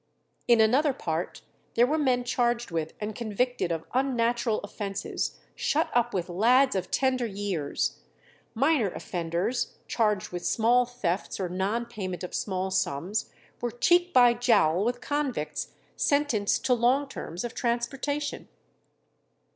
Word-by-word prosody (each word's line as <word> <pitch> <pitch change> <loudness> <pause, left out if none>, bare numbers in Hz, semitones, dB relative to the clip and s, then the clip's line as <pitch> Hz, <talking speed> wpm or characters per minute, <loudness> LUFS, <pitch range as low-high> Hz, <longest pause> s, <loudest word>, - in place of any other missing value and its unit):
In 235 -1 +5
another 265 +7 +4
part 165 -6 -4 0.3
there 240 - +6
were 305 +5 0
men 255 -4 +2
charged 240 -3 0
with 160 -1 -2
and 210 0 -3
convicted 235 -2 -1
of 165 -1 -2
unnatural 240 -3 +1
offences 200 -1 -4 0.2
shut 315 +3 0
up 240 0 +2
with 180 -2 -2
lads 245 +9 +4
of 185 -1 -2
tender 255 -2 +1
years; 195 - -2 0.6
minor 270 -3 +3
offenders 175 +8 -2
charged 210 -4 +1
with 175 -1 -5
small 240 +2 +3
thefts 205 -8 -3
or 185 -2 -2
non 195 +6 -1
payment 190 -7 -5
of 180 - -6
small 190 -1 -2
sums 185 +3 -1 0.3
were 240 - 0
cheek 350 +9 +3
by 245 -6 +6
jowl 210 -8 +3
with 245 +2 -1
convicts 290 -3 -2 0.3
sentenced 285 -10 +1
to 260 - +4
long 250 +4 +2
terms 175 -9 -6
of 240 - -4
transportation. 270 +5 -2
235 Hz, 135 wpm, -27 LUFS, 190-250 Hz, 0.6 s, there